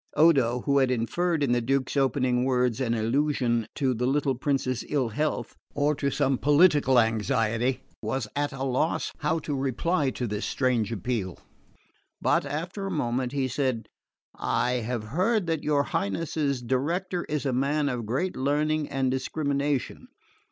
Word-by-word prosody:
Odo, 135 -7 +4
who 140 +1 +2
had 130 -2 +3
inferred 150 +7 0
in 135 - +1
the 120 0 +2
Duke's 135 +3 0
opening 130 -2 +2
words 125 -1 +1
an 120 -2 +1
allusion 120 -1 +1
to 135 -3 +1
the 125 +1 -1
little 140 0 +1
prince's 130 -2 -1
ill 135 -5 +1
health, 150 +7 -2 0.2
or 145 +1 +2
to 140 -1 -1
some 135 -2 +1
political 145 -3 +4
anxiety, 115 +3 +1 0.2
was 130 -5 -2
at 145 0 0
a 135 0 -5
loss 135 +5 0
how 155 +2 +1
to 155 -2 -4
reply 140 +3 0
to 125 - -3
this 105 -1 -3
strange 125 -4 0
appeal; 105 -4 -3 0.8
but - - +1
after 175 +7 -4
a - - -3
moment 125 -6 -1
he 135 -2 0
said, 130 -2 -2 0.5
"I 125 0 0
have 115 0 -3
heard 185 - +1
that 165 -3 -1
your 145 -2 +2
Highness's 140 +4 -1
director 170 +9 -1
is 150 -1 -3
a 135 - 0
man 145 +3 +1
of 120 -5 -3
great 175 +11 -1
learning 150 +2 0
and 135 -2 0
discrimination. 140 +1 -2
135 Hz, 160 wpm, -27 LUFS, 125-150 Hz, 0.8 s, Odo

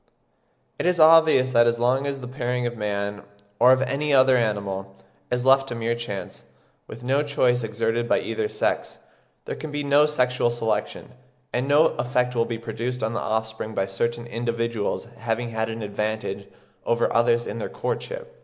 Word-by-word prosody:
It - - 0
is 180 -1 +2
obvious 155 -5 +6
that 120 -1 +5
as 120 0 +2
long 130 +4 +1
as 140 -1 -3
the 125 - -6
pairing 125 -1 -2
of 120 0 -2
man, 100 -1 -3 0.4
or 125 +2 +7
of 130 +1 +4
any 140 +3 -1
other 130 -1 +5
animal, 100 -4 -2 0.3
is 125 0 -1
left 135 0 +5
to 120 - -4
mere 115 0 -1
chance, 100 -6 -6 0.4
with 115 +2 -10
no 135 +3 +2
choice 130 -4 +1
exerted 115 +1 -1
by - - +3
either 110 -1 -2
sex, - - -1 0.5
there - - -4
can 155 - -7
be 145 0 -3
no 145 +1 +4
sexual 125 -4 +1
selection; 120 -1 -3 0.4
and 125 +2 -1
no 145 +3 +5
effect 125 0 0
will 115 -1 +1
be 115 - -4
produced 115 +2 -4
on 110 +1 -1
the 120 - -1
offspring 110 0 -3
by 95 - +1
certain 120 +5 -2
individuals 115 -2 -2
having 115 +1 -2
had 110 0 -2
an 115 0 -5
advantage 105 -1 -3 0.4
over 120 0 +1
others 120 0 +3
in 115 - -5
their - - -4
courtship. - - -5
120 Hz, 180 wpm, -24 LUFS, 110-130 Hz, 0.5 s, or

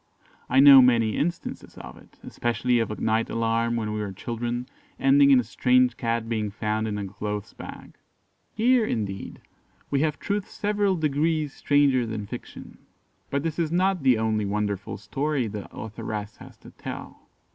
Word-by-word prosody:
I 130 - +4
know 135 -1 +10
many 115 -4 +3
instances 170 +2 -4
of - - -10
it - - -19
especially 120 +1 0
of 115 - -1
a 105 - -5
night 110 +1 0
alarm 115 +1 0
when 110 -2 -2
we 105 - -3
were 105 -2 -3
children, 120 +4 -4 0.3
ending 140 +1 +5
in 135 -2 +7
a - - 0
strange 125 +1 +2
cat 115 -1 -2
being 110 -2 -1
found 110 +1 -2
in 105 -1 -3
a 100 - -3
clothes 105 +1 -5
bag. - - -11 0.5
Here, 240 +2 +3
indeed, 100 - -4 0.5
we 140 - +2
have 150 -2 0
truth 205 -1 -3
several 205 -2 0
degrees 155 -1 0
stranger 140 -4 +2
than 110 -2 -4
fiction; - - -10 0.5
but 140 +1 -1
this 165 0 -3
is 160 -2 0
not 185 0 +1
the 130 -3 +4
only 110 -1 0
wonderful 100 -1 -2
story 135 +6 -2
the 105 -2 -7
authoress 105 -1 -6
has - - -14
to - - -13
tell. - - -9
120 Hz, 170 wpm, -25 LUFS, 110-145 Hz, 0.5 s, know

